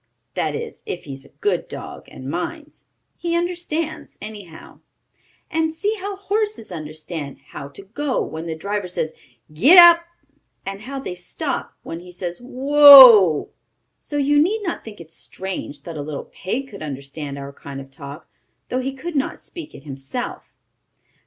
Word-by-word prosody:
that - - -1
is 460 0 -6
if 420 - -4
he 140 - -7
is 135 +1 -10
a - - -17
good 415 - 0
dog, - - -8
and - - -10
minds? - - -5 0.3
He 340 -1 -2
understands, 340 -2 -3
anyhow. 205 -6 -10 0.7
And 320 0 +1
see 405 +7 -1
how 400 +1 -4
horses 415 - -2
understand 155 -2 -6
how 140 - -7
to 140 +8 -12
go 260 +7 -2
when 160 +1 -6
the 160 - -3
driver 200 +3 -3
says 160 -3 -3 0.4
"Gid 260 - +6
dap!" 340 -1 +9 0.6
and 195 +1 -5
how 270 +4 -6
they 265 - -5
stop 180 0 -4
when 165 - -6
he 180 +1 -12
says 175 +2 -5
"Whoa!" 260 - +9 0.5
So 290 - -5
you 290 +1 +4
need 415 +7 +1
not 345 - -3
think 215 -2 -10
it 165 -1 -12
strange 180 -6 -6
that 165 -1 -7
a - - -3
little 145 -1 -6
pig 255 +9 -3
could 200 - -11
understand 140 0 -6
our 140 0 -7
kind 140 0 -9
of 135 0 -11
talk, 140 +3 -10 0.4
though 255 - 0
he 270 +1 -3
could 330 +5 -6
not 275 - -1
speak 325 -3 -10
it - - -12
himself. 135 - -6
205 Hz, 165 wpm, -21 LUFS, -, 0.7 s, dap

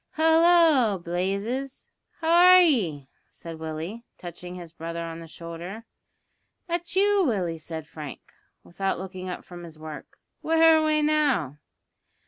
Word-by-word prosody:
"Hallo, 320 - +4
Blazes! 200 +10 -3 0.4
how 325 0 +1 0.2
are - - +9
ye?" 185 - +1 0.2
said 165 -1 -10
Willie, 160 +8 -6
touching 175 +1 -9
his 170 -2 -10
brother 170 0 -5
on 165 0 -7
the 165 - -10
shoulder. 170 +7 -9 0.8
"That 345 0 -4
you, 400 0 +4
Willie?" 185 - -1
said 160 0 -7
Frank, 150 -2 -10 0.3
without 195 +2 -3
looking 185 0 -7
up 180 - -7
from 175 -1 -10
his 165 -2 -11
work. 155 -1 -10 0.2
"Where 325 0 +5
away 310 -1 +2
now?" 285 - +1
185 Hz, 130 wpm, -25 LUFS, -, 0.8 s, are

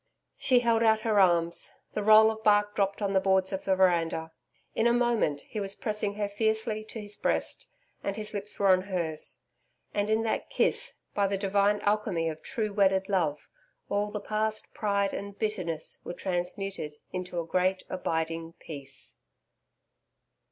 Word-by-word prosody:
She 250 -3 +4
held 230 -1 +3
out 220 -1 +4
her 220 -2 +2
arms. 170 -3 +2 0.2
The 210 - -1
roll 215 +1 +7
of 220 0 -8
bark 205 0 +4
dropped 200 0 0
on 200 -1 0
the 190 - +5
boards 190 0 +2
of 190 - -4
the 190 - +3
veranda. 165 -3 +2 0.4
In 225 - +2
a 235 - +4
moment 235 -12 +1
he 215 - -6
was 200 -1 -2
pressing 210 -3 -1
her 205 -1 -1
fiercely 220 +1 0
to 220 - -6
his 205 -1 -6
breast, - - -1 0.4
and 200 - -2
his 215 0 -5
lips 205 0 -5
were 200 -1 +3
on 185 -1 +6
hers. 170 -5 -2 0.5
And 205 0 0
in 220 +1 +2
that 225 - -1
kiss, - - 0 0.2
by 200 -2 +2
the 195 0 -1
divine 200 +1 +2
alchemy 205 -6 +1
of 155 -1 -7
true 215 -4 -3
wedded 195 -1 +3
love, 165 -7 0 0.4
all 205 +1 0
the 210 - -4
past 215 +1 -2
pride 200 -2 0
and 200 0 -6
bitterness 180 -7 -2
were - - -5
transmuted 180 -3 -3 0.2
into 180 -1 -3
a 165 - -3
great 185 +2 +1
abiding 165 -2 -2
Peace. 140 -5 -10
200 Hz, 170 wpm, -29 LUFS, 180-215 Hz, 0.5 s, roll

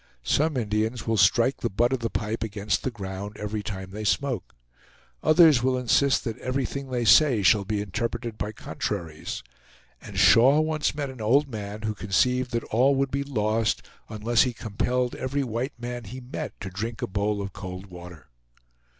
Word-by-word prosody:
Some 150 - +1
Indians 110 +1 -1
will 115 - +1
strike 115 +6 +4
the 120 - -2
butt 120 +6 +1
of 130 - 0
the 115 -1 -2
pipe 110 +1 -3
against 105 -1 -1
the - - -1
ground 100 -2 -7
every 105 0 -3
time 95 -2 -6
they 105 +2 -6
smoke; 120 - -1 0.7
others 155 -5 +6
will 130 0 +1
insist 130 +2 +2
that 115 -1 -4
everything 135 +1 -3
they 120 -2 -1
say 120 -1 +6
shall 100 +2 +4
be 105 0 -1
interpreted 115 +3 -3
by 105 0 -4
contraries; 80 -3 -5 0.6
and - - -9
Shaw 135 +6 +6
once 155 -2 0
met 145 -2 -3
an 130 -3 -10
old 135 +7 +3
man 105 -3 -6
who 110 0 -1
conceived 125 +5 +1
that 115 -1 -2
all 130 +5 +4
would 135 0 0
be 140 +1 -1
lost 110 -4 0 0.2
unless 110 +2 +1
he 125 -2 +2
compelled 125 +3 -1
every 140 +2 -2
white 120 +2 -4
man 120 -1 -5
he 125 +6 -8
met 125 0 -7
to 95 -1 -5
drink 110 +5 -4
a - - 0
bowl 100 +2 -1
of 100 -1 -5
cold 95 0 -7
water. 90 -3 -11
115 Hz, 180 wpm, -26 LUFS, 105-130 Hz, 0.7 s, others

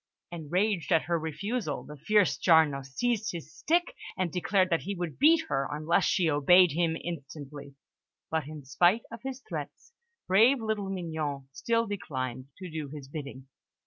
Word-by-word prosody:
Enraged 175 +4 -1
at 165 -2 +4
her 170 +1 0
refusal, 160 - -3
the 150 +3 -10
fierce 205 +6 +2
Giarno 160 -5 +4
seized 220 - -1
his 160 -2 -8
stick, 350 +8 0 0.2
and 185 -3 -1
declared 185 +1 +1
that 165 - +2
he 200 +1 -4
would 175 -4 -5
beat 320 +3 +5
her 135 - -1
unless 155 +3 +1
she 180 -4 +2
obeyed 160 +4 +5
him 165 +1 0
instantly; 145 -3 -8 0.6
but, 160 -3 -1
in 150 -2 -9
spite 175 - +3
of 230 - -8
his 265 0 -6
threats, - - -7 0.3
brave 230 +8 +5
little 215 -3 -2
Mignon 160 -7 -4
still 230 +11 0
declined 130 - -4
to 185 - -7
do 155 -2 -4
his 145 -2 -9
bidding. 140 -2 -8
170 Hz, 160 wpm, -29 LUFS, 145-205 Hz, 0.6 s, beat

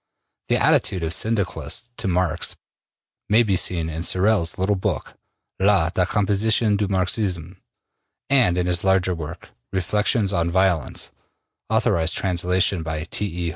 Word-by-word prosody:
The - - +2
attitude 90 -3 +2
of 80 +1 0
Syndicalists 100 - -2
to 110 - -1
Marx 90 -2 0 0.7
may 110 +3 +5
be 100 -4 +1
seen 85 -2 +1
in 80 0 -5
Sorel's 95 0 +1
little 95 +2 +1
book, 95 - -3 0.5
``La 95 -4 +3
Decomposition 105 +3 +1
du 100 0 0
Marxisme,'' 95 -2 -1 0.7
and 120 -11 +3
in 90 - 0
his 90 -1 0
larger 95 -1 +2
work, 80 -3 -8 0.2
``Reflections 100 +2 0
on 85 0 +1
Violence,'' 90 -5 0 0.6
authorized 80 0 +1
translation 90 0 0
by 80 -1 -4
T. 105 - -2
E. 85 -2 -4
95 Hz, 135 wpm, -22 LUFS, 85-100 Hz, 0.7 s, may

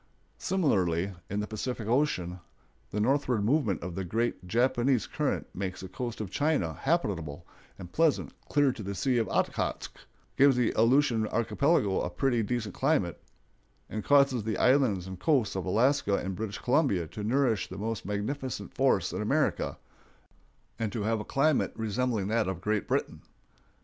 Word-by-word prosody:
Similarly, 95 - +1 0.2
in 100 +1 -1
the - - -2
Pacific 110 +1 -4
Ocean, 110 - 0 0.5
the 105 - -3
northward 125 -2 +1
movement 115 - +1
of 90 0 -5
the 95 - -3
great 110 0 -2
Japanese 120 +3 +2
current - - -2
makes 95 -1 -4
the 95 - -6
coast 120 +5 -5
of 105 -4 -5
China 145 - +1
habitable 85 - -2 0.3
and 90 -2 -10
pleasant 160 -2 +1 0.2
clear 145 -2 +3
to 125 - -8
the 100 0 -4
Sea 125 +6 +1
of 115 - 0
Okhotsk, - - -1 0.5
gives 140 -1 +6
the 125 -2 +1
Aleutian 115 -1 +3
archipelago 115 - +1
a - - -2
pretty 120 +6 +1
decent 110 -2 -2
climate, 115 - 0 0.7
and 110 -1 -3
causes 140 -5 +4
the 110 0 -2
islands 125 -9 +3
and 95 -1 -8
coasts 130 - +2
of 95 - -3
Alaska 115 +1 +2
and 95 -1 -3
British 105 +1 -4
Columbia 125 - +1
to 95 +7 -7
nourish 115 -3 +1
the 95 - -7
most 110 +2 -3
magnificent 110 +6 -4
forests - - +2
in - - -2
America, - - 0 1.0
and 110 -2 -1
to 110 -1 -3
have 110 +1 0
a - - -4
climate 140 +5 +1
resembling 110 -1 -1
that 110 -1 +1
of 95 -2 -3
Great 105 +2 -1
Britain. - - -1
110 Hz, 160 wpm, -29 LUFS, 95-130 Hz, 1.0 s, gives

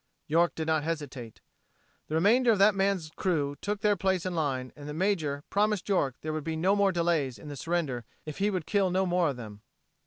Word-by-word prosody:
York 170 +3 +2
did 160 - -3
not 160 -1 +1
hesitate. 140 -8 -5 0.7
The 155 - -3
remainder 230 +8 +4
of 215 - +3
that 200 +1 +5
gun's 195 -5 0
crew 145 -6 0
took 205 0 -2
their 210 -2 +3
place 190 -2 0
in 185 - -2
line, 135 -6 -2
and 145 0 -9
the 150 - -5
major 160 -6 0
promised 210 -1 +1
York 140 -10 +1
there 155 0 -3
would 155 -1 -3
be 160 +1 -3
no 185 +5 +2
more 200 -1 +3
delays 165 -7 0
in 150 - -10
the 145 - -6
surrenders 150 -5 -2 0.2
if 155 +3 -7
he 205 +1 +2
would 185 -6 -2
kill 200 -2 +2
no 190 +1 +1
more 175 -2 +2
of 135 - -4
them. 105 -3 -9
165 Hz, 220 wpm, -29 LUFS, 145-195 Hz, 0.7 s, that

